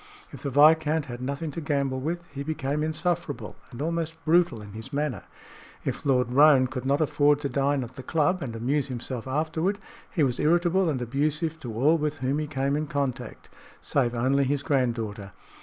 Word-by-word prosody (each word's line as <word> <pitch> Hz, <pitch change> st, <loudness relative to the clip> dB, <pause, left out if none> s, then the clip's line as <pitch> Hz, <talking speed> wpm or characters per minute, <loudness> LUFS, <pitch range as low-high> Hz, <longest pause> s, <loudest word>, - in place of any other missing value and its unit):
If -, -, -10 dB
the 140 Hz, -, -2 dB
viscount 155 Hz, +2 st, +4 dB
had 120 Hz, -3 st, -7 dB
nothing 140 Hz, +4 st, -3 dB
to 165 Hz, -, -5 dB
gamble 140 Hz, -3 st, -1 dB
with, 170 Hz, +5 st, -3 dB
he 140 Hz, -, -5 dB
became 145 Hz, -1 st, -2 dB
insufferable 160 Hz, 0 st, -2 dB
and 125 Hz, +2 st, -6 dB
almost 165 Hz, 0 st, -2 dB
brutal 165 Hz, -6 st, +3 dB
in 105 Hz, -1 st, -10 dB
his 110 Hz, +5 st, -7 dB
manner; 145 Hz, -2 st, -2 dB, 0.6 s
if -, -, -3 dB
Lord 125 Hz, -3 st, +2 dB
Roane 140 Hz, -1 st, +6 dB
could 125 Hz, 0 st, -4 dB
not 140 Hz, +3 st, +2 dB
afford 145 Hz, -1 st, +3 dB
to 140 Hz, -, -2 dB
dine 140 Hz, -1 st, +1 dB
at 125 Hz, +1 st, -9 dB
the -, -, -5 dB
club 165 Hz, +7 st, +1 dB
and 120 Hz, -5 st, -4 dB
amuse 135 Hz, +5 st, 0 dB
himself 125 Hz, -1 st, -4 dB
afterward, 160 Hz, +7 st, 0 dB, 0.3 s
he 160 Hz, -, +1 dB
was 125 Hz, -3 st, 0 dB
irritable 175 Hz, +3 st, +3 dB
and 130 Hz, -5 st, -1 dB
abusive 150 Hz, +6 st, -1 dB
to 120 Hz, -7 st, -7 dB
all 150 Hz, +8 st, +3 dB
with 150 Hz, 0 st, -1 dB
whom 135 Hz, +3 st, -1 dB
he 155 Hz, -, -2 dB
came 140 Hz, -1 st, -1 dB
in 155 Hz, +1 st, -2 dB
contact, 140 Hz, -3 st, -4 dB, 0.3 s
save 125 Hz, -4 st, 0 dB
only 135 Hz, +4 st, +2 dB
his 140 Hz, +1 st, -1 dB
granddaughter. 115 Hz, -8 st, -1 dB
140 Hz, 190 wpm, -26 LUFS, 130-155 Hz, 0.6 s, Roane